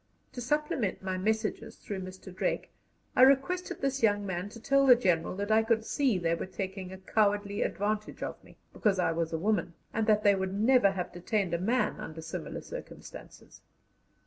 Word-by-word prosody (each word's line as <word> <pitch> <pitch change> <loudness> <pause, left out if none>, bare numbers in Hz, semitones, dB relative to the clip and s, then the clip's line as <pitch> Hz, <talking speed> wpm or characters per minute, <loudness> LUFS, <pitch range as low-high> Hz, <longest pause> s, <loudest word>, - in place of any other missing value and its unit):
To 250 - -6
supplement 255 -7 -1
my 185 -1 -2
messages 220 +2 -1
through 200 -2 -6
Mr. 185 0 -9
Drake, - - -2 0.4
I - - +4
requested 275 +8 +3
this 275 0 -1
young 205 -2 +3
man 185 +1 -3
to 230 - -11
tell 275 +3 +3
the 250 - +9
General 180 -8 +1
that 205 +2 -3
I 220 +1 +6
could 225 0 +1
see 260 -7 +1
they 170 -2 0
were 170 - -3
taking 190 -1 -5
a 190 - -8
cowardly 205 +1 0
advantage 210 +1 -2
of - - -6
me - - -18 0.2
because 205 -3 +1
I 180 - +2
was 165 0 -1
a 165 - -1
woman, 175 -2 0 0.2
and 220 0 0
that 210 -1 +4
they 205 - +6
would 190 0 -2
never 225 0 +5
have 180 -2 -4
detained 180 +1 -1
a 170 - +1
man 240 +6 +1
under 160 0 -7
similar - - -5
circumstances. - - -11
205 Hz, 190 wpm, -30 LUFS, 185-230 Hz, 0.4 s, the